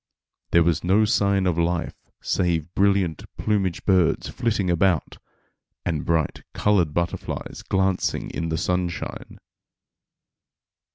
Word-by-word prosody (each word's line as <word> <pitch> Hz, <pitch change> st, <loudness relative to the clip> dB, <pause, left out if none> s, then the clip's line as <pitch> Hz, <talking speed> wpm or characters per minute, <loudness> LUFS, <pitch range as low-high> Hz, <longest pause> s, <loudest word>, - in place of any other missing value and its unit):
There 85 Hz, -, +5 dB
was 85 Hz, -1 st, +1 dB
no 100 Hz, +5 st, +4 dB
sign 100 Hz, -2 st, +2 dB
of 85 Hz, -2 st, +1 dB
life 85 Hz, 0 st, 0 dB, 0.3 s
save 85 Hz, -2 st, 0 dB
brilliant 95 Hz, -5 st, +2 dB
plumaged 95 Hz, -5 st, -1 dB
birds 95 Hz, -4 st, +2 dB
flitting 105 Hz, -5 st, -1 dB
about, 90 Hz, -1 st, +1 dB, 0.7 s
and 80 Hz, -4 st, -1 dB
bright 80 Hz, -3 st, 0 dB
colored 95 Hz, -7 st, +2 dB
butterflies 85 Hz, +3 st, -3 dB
glancing 95 Hz, -1 st, 0 dB
in 85 Hz, 0 st, -3 dB
the 80 Hz, -, -1 dB
sunshine. 90 Hz, -1 st, -3 dB
90 Hz, 110 wpm, -24 LUFS, 85-95 Hz, 0.7 s, There